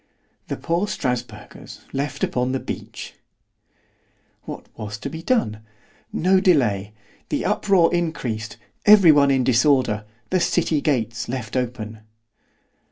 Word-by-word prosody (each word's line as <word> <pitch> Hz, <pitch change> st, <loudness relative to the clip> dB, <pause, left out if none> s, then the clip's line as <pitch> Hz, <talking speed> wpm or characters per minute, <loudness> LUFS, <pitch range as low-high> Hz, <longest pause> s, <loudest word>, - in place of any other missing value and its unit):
——The -, -, -3 dB
poor 170 Hz, +5 st, -1 dB
Strasburgers 125 Hz, -8 st, -5 dB
left 140 Hz, +1 st, -3 dB
upon 125 Hz, +1 st, 0 dB
the 135 Hz, -, 0 dB
beach! -, -, -7 dB, 1.3 s
——What -, -, -7 dB
was 105 Hz, 0 st, -6 dB
to 140 Hz, -, -6 dB
be 160 Hz, +1 st, -6 dB
done?—No 160 Hz, -, -1 dB
delay—the 110 Hz, -, 0 dB
uproar 185 Hz, -5 st, +3 dB
increased——every 165 Hz, -, +3 dB
one 145 Hz, -2 st, +5 dB
in 135 Hz, -2 st, +3 dB
disorder——the 120 Hz, -, +1 dB
city 160 Hz, -3 st, +1 dB
gates 115 Hz, -6 st, 0 dB
set 120 Hz, -3 st, -5 dB
open. 115 Hz, -3 st, -3 dB
130 Hz, 100 wpm, -22 LUFS, 110-165 Hz, 1.3 s, one